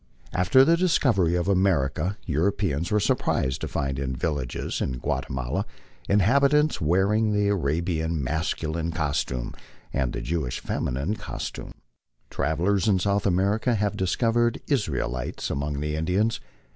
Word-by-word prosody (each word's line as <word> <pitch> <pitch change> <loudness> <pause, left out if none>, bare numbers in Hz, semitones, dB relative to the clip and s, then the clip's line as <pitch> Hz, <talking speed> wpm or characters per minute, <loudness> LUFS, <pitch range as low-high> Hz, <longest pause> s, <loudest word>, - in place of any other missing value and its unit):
After 90 +9 +5
the 165 +3 +5
dis 180 -1 +3
covery 90 - +2
of 85 - -2
America 90 -2 +1
Europeans 85 0 0
were 105 - +2
surprised 65 -9 0
to - - -2
find 70 -1 -2
in 65 -2 -2
villages 70 -2 -3
in 65 -2 -2
Guatemala 65 0 -2 0.5
inhabitants 140 +8 +3
wearing 100 +7 +2
the 105 0 +2
Arabian 80 -2 0
masculine 80 +3 -2
costume 75 -6 -2 0.4
and 65 -3 0
the - - -4
Jewish 80 -6 -2
feminine 70 +12 -2
costume. - - -6 0.6
Travellers 90 +7 +1
in 100 -3 +4
South 100 +2 +1
America 100 +6 +2
have 105 -2 0
discovered 115 +5 +1
Israelites 70 - -2
among 70 +1 -2
the 75 0 -2
Indians. 95 +8 0
90 Hz, 130 wpm, -25 LUFS, 75-105 Hz, 0.6 s, After